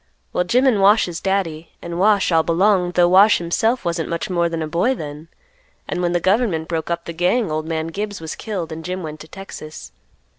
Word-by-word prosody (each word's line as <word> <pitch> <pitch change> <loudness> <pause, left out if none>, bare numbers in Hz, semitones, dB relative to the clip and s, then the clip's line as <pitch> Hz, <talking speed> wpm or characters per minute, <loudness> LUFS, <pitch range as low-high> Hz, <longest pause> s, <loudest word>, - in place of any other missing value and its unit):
Well, 180 - +1
Jim 250 +9 +2
and 230 -7 +3
Wash's 195 -4 +3
daddy, 170 -5 -2
and 170 0 -6
Wash, 200 -1 +3
all 165 -1 +4
belonged, 180 +2 +2
'though 175 -1 +5
Wash 195 +4 +6
himself 220 +8 0
wasn't 170 -1 -2
much 185 +4 -3
more 170 -1 +1
than 165 -1 -3
a - - -3
boy 175 +12 +1
then; 150 -3 -8 0.6
and 180 - -3
when 175 -1 0
the 175 - +1
government 190 -4 +1
broke 165 -1 -3
up 170 0 -2
the 170 - -6
gang, 180 +4 +1
old 155 +1 -2
man 160 -1 -2
Gibbs 205 +3 -4
was 160 -1 -6
killed, 185 -7 -5
and 160 +1 -6
Jim 180 +2 -4
went 155 -1 -7
to 155 - -11
Texas. 160 -4 -10
175 Hz, 215 wpm, -20 LUFS, 165-200 Hz, 0.6 s, Wash